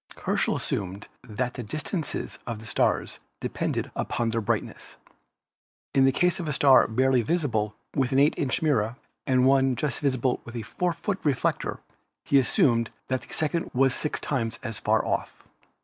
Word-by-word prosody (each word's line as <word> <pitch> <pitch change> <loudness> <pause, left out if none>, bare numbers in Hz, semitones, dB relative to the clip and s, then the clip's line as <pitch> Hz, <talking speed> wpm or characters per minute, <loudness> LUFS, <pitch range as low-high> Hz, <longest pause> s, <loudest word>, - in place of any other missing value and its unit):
Herschel - - +1
assumed 95 +1 -4
that 125 +1 -3
the - - -5
distances 155 - -3
of 115 -2 -3
the 110 - -11
stars - - 0 0.2
depended - - -2
upon 115 -1 -1
their 115 0 0
brightness. 110 0 -3 1.0
In 135 -2 +5
the 135 - +5
case 180 +7 +2
of 170 - -4
a 150 - -1
star 135 -2 +6
barely 130 +2 +3
visible 115 -7 0 0.2
with 135 -1 +1
an 135 - +2
8 145 +2 +5
inch 145 +4 -1
mirror 120 -7 +1 0.3
and 130 -1 +4
one 135 -1 +4
just 140 0 -2
visible 130 -3 0
with 120 - -10
a 115 - -3
4 180 - -1
foot 195 +3 -3
reflector 140 -5 0 0.4
he 140 - +5
assumed 115 -2 +2 0.2
that 130 -1 0
the - - -15
second 160 +2 -1
was 135 0 +4
six 150 - -2
times 115 -5 -2
as 115 -1 -3
far 110 0 +2
off. - - -3
130 Hz, 170 wpm, -26 LUFS, 115-145 Hz, 1.0 s, star